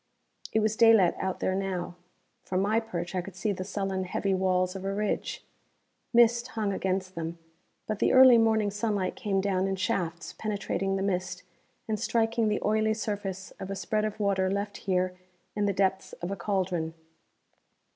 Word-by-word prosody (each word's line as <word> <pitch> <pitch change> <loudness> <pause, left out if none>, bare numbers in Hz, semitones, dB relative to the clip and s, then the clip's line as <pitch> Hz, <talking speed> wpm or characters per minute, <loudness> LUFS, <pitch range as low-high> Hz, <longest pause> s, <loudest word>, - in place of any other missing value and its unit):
It 220 - +2
was 215 0 +1
daylight 225 -6 +6
out 190 -1 -2
there 185 - +1
now. 190 -2 -2 0.5
From 185 - -2
my 210 +3 +2
perch 175 -6 -5
I 185 - 0
could 180 +1 -10
see 210 +3 -1
the 185 -1 -3
sullen 195 -1 -2
heavy 195 +2 -1
walls 185 0 +1
of 190 - -6
a 195 - -1
ridge. 205 +1 -2 0.7
Mist 235 0 +4
hung 210 -3 -2
against 185 0 -2
them, 165 0 -5 0.5
but 215 -1 -3
the - - +3
early 255 -2 +8
morning 220 -2 +3
sunlight 205 -2 -1
came 195 -2 0
down 190 -1 +1
in 195 - -1
shafts 180 -3 -2
penetrating 195 -2 -2
the 195 - -1
mist 185 -1 -2 0.4
and 215 -1 -1
striking 230 0 +1
the 210 - 0
oily 220 +1 +2
surface 200 -3 -4
of 190 - -6
a 195 - -3
spread 215 +2 -1
of 215 0 -3
water 195 -2 +1
left 200 0 -2
here 185 -1 0 0.4
in 205 -1 +1
the - - +2
depths 190 0 0
of 175 +2 -5
a - - -1
cauldron. 180 -4 -1
195 Hz, 175 wpm, -28 LUFS, 185-215 Hz, 0.7 s, early